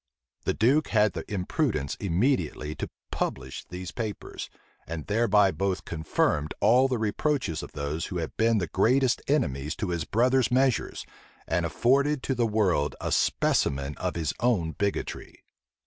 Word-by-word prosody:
The - - +1
duke 135 +7 +3
had 105 -3 +3
the - - -4
imprudence 95 - -1
immediately 90 - 0
to - - -5 0.2
publish 65 -1 -3
these 90 0 -6
papers, 110 -4 -5 0.4
and 80 -2 -5
thereby 105 -2 +3
both 95 -1 -2
confirmed 75 -2 0
all 125 +6 +5
the 130 -2 -1
reproaches 110 - -1
of - - -9
those 75 +2 -3
who 90 - -4
had 80 -2 -4
been 115 0 +3
the 95 - 0
greatest 120 - +2
enemies 75 - 0
to 105 - -3
his 85 -3 -1
brother's 125 +3 +2
measures, 130 -1 +1 0.4
and - - +1
afforded 140 +3 +2
to 135 - 0
the 120 -2 +1
world 95 -10 +1
a - - -3
specimen 70 +1 +1
of 90 -1 -2
his 80 -3 -1
own 105 -10 +1
bigotry. 100 +4 -4
100 Hz, 150 wpm, -27 LUFS, 80-125 Hz, 0.4 s, all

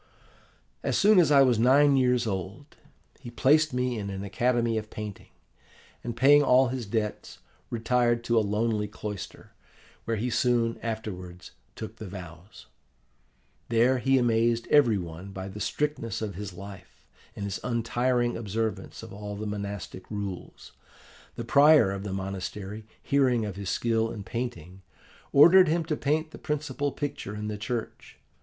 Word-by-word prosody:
"As - - 0
soon 210 -1 +6
as 165 -5 +4
I 140 -1 +7
was 125 -4 +3
nine 140 +4 +5
years 125 -2 +2
old, 100 - -5 0.4
he - - -9
placed 150 +6 +3
me 125 -2 -1
in 100 -1 -4
an 95 0 -5
academy 115 +2 0
of 110 0 -10
painting, 105 -2 -8 0.7
and, 120 -1 -5
paying 145 +4 +6
all 130 -2 +4
his 125 -4 -4
debts, 105 0 -3 0.3
retired 120 0 +1
to 120 0 0
a - - +6
lonely 105 +1 0
cloister, 105 -2 -8 0.5
where 115 -1 -1
he 120 +4 -2
soon 115 -1 +1
afterwards 95 -6 -6 0.2
took 110 0 -8
the 110 - -8
vows. 90 0 -11 1.0
There 120 +3 +3
he 135 +1 +3
amazed 115 -1 +2
every 125 -8 +5
one 90 +2 -7
by 95 0 -6
the 100 +2 -8
strictness 145 -3 -2
of 110 -2 -4
his 100 +1 -6
life, 100 +2 -12 0.3
and 100 - -5
his 100 -2 -4
untiring 120 +1 0
observance 110 -1 -4
of - - -10
all 105 0 -6
the 105 +2 -5
monastic 100 -3 -6
rules. 100 -4 -7 0.6
The 115 - -5
prior 140 -3 +6
of 100 0 -4
the 100 - -5
monastery, 95 +2 -5 0.2
hearing 130 -5 +2
of 100 -3 -5
his 100 -2 -5
skill 115 -1 0
in 105 - -7
painting, 95 -7 -6 0.5
ordered 175 +6 +7
him 165 +1 0
to 155 -1 -1
paint 155 +2 -1
the - - -11
principal 150 -1 -2
picture 140 -9 -5
in 105 0 -4
the 105 - -4
church. 115 +1 -5
115 Hz, 155 wpm, -27 LUFS, 100-125 Hz, 1.0 s, I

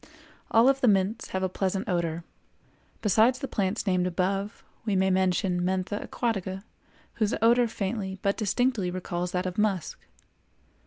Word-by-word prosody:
All 230 +2 +5
of 270 0 +3
the 255 - +4
mints 200 +2 +2
have 190 0 -3
a - - +2
pleasant 190 +1 -2
odor; 170 -2 -1 0.8
besides 220 +5 +4
the 270 - -4
plants 200 0 -1
named 185 -2 +1
above, 195 +4 -2 0.2
we 210 -3 0
may 190 0 +3
mention 185 -1 +1
Mentha 190 +2 -1
aquatica, 195 -5 -2 0.6
whose 215 +1 +2
odor 235 +2 +4
faintly 195 -2 -3
but 200 0 +2
distinctly 220 -2 0
recalls 180 -1 -3
that 180 0 -1
of 185 +2 -3
musk. 200 -6 0
195 Hz, 150 wpm, -27 LUFS, 185-220 Hz, 0.8 s, All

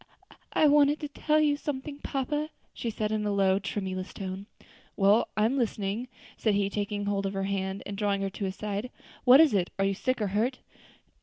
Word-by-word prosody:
"I - - +4
wanted 290 0 +5
to 300 - -3
tell 305 +1 +1
you 295 -1 +3
something, 285 0 -5
papa," 295 +3 -2 0.2
she 235 - -3
said 215 -1 -2
in 215 -1 0
a 210 - 0
low, 195 -1 +3
tremulous 190 -2 -4
tone. 190 +1 -5 0.5
"Well, 205 +3 +4
I 215 - +4
am 265 +5 +1
listening," 215 0 -2 0.3
said 215 -3 +1
he, 200 0 +1
taking 205 0 -2
hold 200 -1 0
of 195 - -4
her 195 0 -2
hand 195 0 -2
and 200 - -5
drawing 200 -1 0
her 195 - -2
to 200 - -4
his 190 0 -3
side. 210 +3 -3 0.4
"What 255 +2 +9
is 315 -7 +6
it? 185 -3 +1
are 195 - +2
you 195 - +1
sick 255 +6 -1
or 210 -2 0
hurt?" 230 +6 0
205 Hz, 210 wpm, -28 LUFS, 195-260 Hz, 0.5 s, What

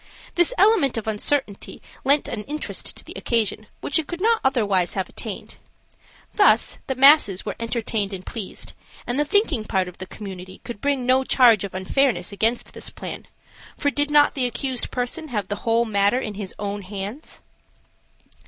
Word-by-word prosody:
This 350 +6 +3
element 390 - +4
of 220 - -4
uncertainty 220 0 -1 0.2
lent 280 +2 +4
an 210 - -4
interest 300 +2 -3
to - - -6
the - - -10
occasion 215 -2 -1
which 285 - +1
it 310 - -4
could 345 - -5
not 455 +3 +2
otherwise 205 -9 +1
have 190 -2 -1
attained. - - -7 0.8
Thus, 410 - +4
the 265 - -1
masses 265 -8 +6
were 205 - -4
entertained 225 -3 -2
and 185 -2 -7
pleased, 215 -5 -6 0.3
and 245 +3 -1
the 295 - +2
thinking 315 - +2
part 190 -3 0
of 180 - -11
the 185 - -7
community 185 -2 -9
could 235 -4 -8
bring 280 -3 0
no 260 +1 +4
charge 240 -6 +5
of 195 -2 -6
unfairness 190 0 0
against 225 +4 0
this - - -6
plan, - - -8 0.5
for 285 - +1
did 290 +1 +2
not 295 0 +5
the 255 -3 +1
accused 255 +1 -2
person 250 +6 -3
have 210 -8 -3
the 205 - -2
whole 230 +1 +3
matter 205 +1 +2
in 215 -5 -4
his 195 -2 -6
own 205 0 -4
hands? 200 +8 -7
235 Hz, 175 wpm, -23 LUFS, 200-280 Hz, 0.8 s, masses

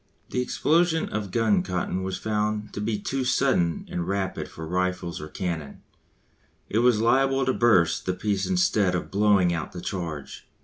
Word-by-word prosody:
The 125 - 0
explosion 160 +5 +1
of 105 -2 -3
gun 105 -2 +2
cotton 90 0 -2
was 95 0 -3
found 105 -1 -2
to 105 - -4
be 105 0 -1
too 135 +6 -2
sudden 125 -10 +1
and 85 -1 -4
rapid 95 -1 -2
for 80 - -8
rifles 90 0 -2
or 75 - -6
cannon; 80 -4 -5 0.8
it 110 - 0
was 120 -2 +4
liable 135 +3 +3
to 130 - +2
burst 95 -10 +3
the 95 - +1
piece 100 0 -1
instead 110 - +2
of 90 - -4
blowing 100 -3 +3
out 80 -2 -4
the 90 - -6
charge. 85 -7 -5
100 Hz, 170 wpm, -25 LUFS, 90-115 Hz, 0.8 s, was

